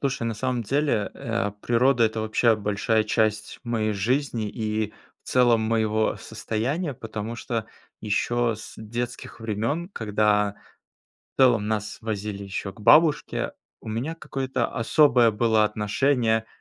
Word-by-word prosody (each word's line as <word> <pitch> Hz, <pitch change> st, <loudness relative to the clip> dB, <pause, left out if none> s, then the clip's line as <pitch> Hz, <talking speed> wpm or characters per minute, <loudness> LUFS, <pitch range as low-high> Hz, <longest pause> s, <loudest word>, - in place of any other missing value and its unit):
Слушай, 135 Hz, -4 st, -1 dB
на 115 Hz, -1 st, -1 dB
самом 125 Hz, +2 st, -1 dB
деле, 130 Hz, -3 st, 0 dB
э, 115 Hz, -3 st, -2 dB
природа- 120 Hz, +1 st, +3 dB
это 110 Hz, 0 st, 0 dB
вообще 110 Hz, +1 st, +3 dB
большая 105 Hz, +1 st, +1 dB
часть 110 Hz, 0 st, 0 dB
моей 110 Hz, -2 st, 0 dB
жизни 115 Hz, +2 st, -1 dB
и 110 Hz, -1 st, -2 dB, 0.3 s
в -, -, -14 dB
целом 120 Hz, -3 st, +4 dB
моего 110 Hz, -1 st, +1 dB
состояния, 140 Hz, +8 st, -3 dB
потому 110 Hz, 0 st, -6 dB
что 115 Hz, -2 st, -3 dB, 0.3 s
ещё 115 Hz, +3 st, 0 dB
с 110 Hz, -, -10 dB
детских 120 Hz, +2 st, -6 dB
времён, 115 Hz, -, -2 dB
когда 105 Hz, -, +1 dB, 0.8 s
в -, -, -59 dB
целом 120 Hz, -5 st, +4 dB
нас 105 Hz, -1 st, -2 dB
возили 105 Hz, -2 st, -4 dB
ещё 100 Hz, 0 st, -4 dB
к 110 Hz, -, -18 dB
бабушке, 150 Hz, +6 st, +4 dB, 0.3 s
у -, -, -8 dB
меня 125 Hz, +9 st, -3 dB
какое-то 130 Hz, -5 st, -2 dB
особое 120 Hz, -1 st, +4 dB
было 110 Hz, 0 st, +3 dB
отношение 110 Hz, +2 st, +1 dB
к, 110 Hz, -, -26 dB
110 Hz, 135 wpm, -25 LUFS, 105-125 Hz, 0.8 s, целом